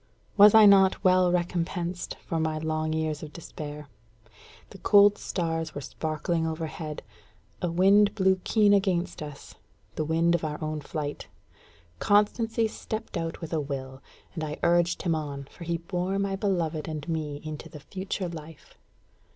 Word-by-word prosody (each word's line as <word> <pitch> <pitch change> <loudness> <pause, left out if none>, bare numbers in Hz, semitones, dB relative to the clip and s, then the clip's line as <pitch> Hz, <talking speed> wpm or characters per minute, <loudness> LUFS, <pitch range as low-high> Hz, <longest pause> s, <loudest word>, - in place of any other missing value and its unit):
Was 205 +1 +8
I 220 -1 +9
not 195 -2 +5
well 185 -1 +4
recompensed 175 0 -2
for 165 - -2
my 160 -1 -1
long 155 0 -2
years 155 -1 -2
of 150 - -8
despair? 150 -3 -8 0.8
The - - -12
cold 205 0 +5
stars 165 -3 -3
were 145 - -4
sparkling 160 +3 -2
overhead; 160 -1 -5 0.6
a 180 - 0
wind 200 +4 +4
blew 190 -2 +2
keen 210 -2 +4
against 185 -4 0
us 150 -2 -9 0.4
the 155 - -2
wind 165 +2 +2
of 170 - 0
our 150 -1 -2
own 155 -1 -3
flight; 145 0 -5 0.7
Constancy 225 +2 +2
stepped 220 +1 -6
out 165 +1 -3
with 165 0 -6
a 160 - +1
will; 135 -2 -6 0.3
and 160 - -4
I 150 -1 -4
urged 175 0 +2
him 170 -3 +1
on, 145 -3 -4
for 170 - -10
he 170 0 -1
bore 180 +3 -2
my 200 -1 -1
beloved 175 -6 -1
and 155 -2 -5
me 155 -3 -3
into 155 -1 -7
the 150 - -10
future 190 +2 -4
life. 160 -2 -11
165 Hz, 160 wpm, -27 LUFS, 155-190 Hz, 0.8 s, I